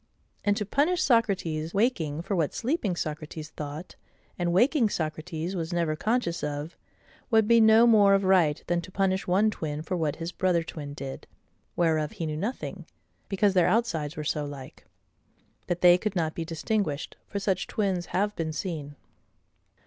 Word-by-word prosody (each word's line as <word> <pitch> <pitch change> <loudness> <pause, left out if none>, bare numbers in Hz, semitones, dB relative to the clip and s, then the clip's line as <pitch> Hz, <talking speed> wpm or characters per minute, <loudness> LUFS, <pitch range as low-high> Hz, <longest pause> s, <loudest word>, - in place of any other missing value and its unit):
And 205 -1 +2
to 210 - -2
punish 300 - +1
Socrates 185 - +1
waking 170 - 0
for 195 +2 -2
what 160 -5 0
sleeping 235 - -1
Socrates 155 -1 -5
thought, 150 +3 -7 0.4
and 175 -1 -1
waking 240 - +3
Socrates 160 +2 -3
was 165 -1 -3
never 170 -3 0
conscious 215 -1 -1
of, 150 +2 -4 0.5
would 220 -3 +4
be 230 0 +6
no 220 +1 +7
more 205 -4 +6
of 195 - +1
right, 180 -6 +3
than 175 0 0
to 185 - -11
punish 190 0 0
one 200 +4 +3
twin 155 -5 -4
for 180 - -3
what 160 -4 -1
his 165 +1 -5
brother 180 -2 +1
twin 145 -3 -7
did, 135 -2 -7 0.5
whereof 160 -2 +1
he 185 -6 -4
knew 155 -1 -3
nothing, 210 +11 -4 0.4
because 200 0 +2
their 180 -3 +4
outsides 175 -9 0
were 155 - -3
so 150 0 -1
like, 140 -2 -9 0.8
that 175 0 -2
they 180 0 +7
could 215 0 -3
not 160 -3 0
be 165 - -4
distinguished; 165 -1 -2
for - - -5
such 190 -2 -1
twins 190 -4 -1
have 205 +2 0
been 160 -1 -2
seen. 155 -3 -5
175 Hz, 170 wpm, -27 LUFS, 155-205 Hz, 0.8 s, no